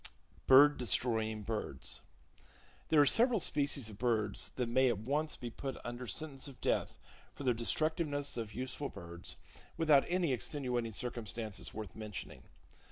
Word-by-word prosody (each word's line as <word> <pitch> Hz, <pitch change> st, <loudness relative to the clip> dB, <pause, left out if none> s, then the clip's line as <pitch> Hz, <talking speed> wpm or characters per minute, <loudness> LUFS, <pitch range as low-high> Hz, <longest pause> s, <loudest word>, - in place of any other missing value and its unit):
Bird 145 Hz, +3 st, +8 dB
Destroying 110 Hz, -3 st, 0 dB
Birds. 105 Hz, -, -4 dB, 0.9 s
—There 155 Hz, -, +5 dB
are -, -, +6 dB
several 235 Hz, -, +5 dB
species 140 Hz, -6 st, +1 dB
of 105 Hz, -2 st, -11 dB
birds 110 Hz, -4 st, 0 dB
that 125 Hz, -2 st, -1 dB
may 130 Hz, +3 st, +4 dB
at 120 Hz, -, 0 dB
once 145 Hz, +8 st, -1 dB
be 120 Hz, -1 st, -6 dB
put 135 Hz, +3 st, -5 dB
under 120 Hz, +1 st, -5 dB
sentence 135 Hz, +6 st, -4 dB
of 135 Hz, -, -12 dB
death -, -, 0 dB, 0.4 s
for -, -, -7 dB
their 125 Hz, -2 st, +3 dB
destructiveness 145 Hz, +4 st, 0 dB
of 110 Hz, -3 st, -5 dB
useful 130 Hz, +3 st, -3 dB
birds, 85 Hz, +1 st, -7 dB, 0.4 s
without 155 Hz, -4 st, +5 dB
any 175 Hz, -5 st, +2 dB
extenuating 125 Hz, -2 st, -1 dB
circumstances 110 Hz, -2 st, -4 dB
worth 105 Hz, -5 st, -7 dB
mentioning. 105 Hz, -2 st, -7 dB
125 Hz, 145 wpm, -34 LUFS, 110-145 Hz, 0.9 s, Bird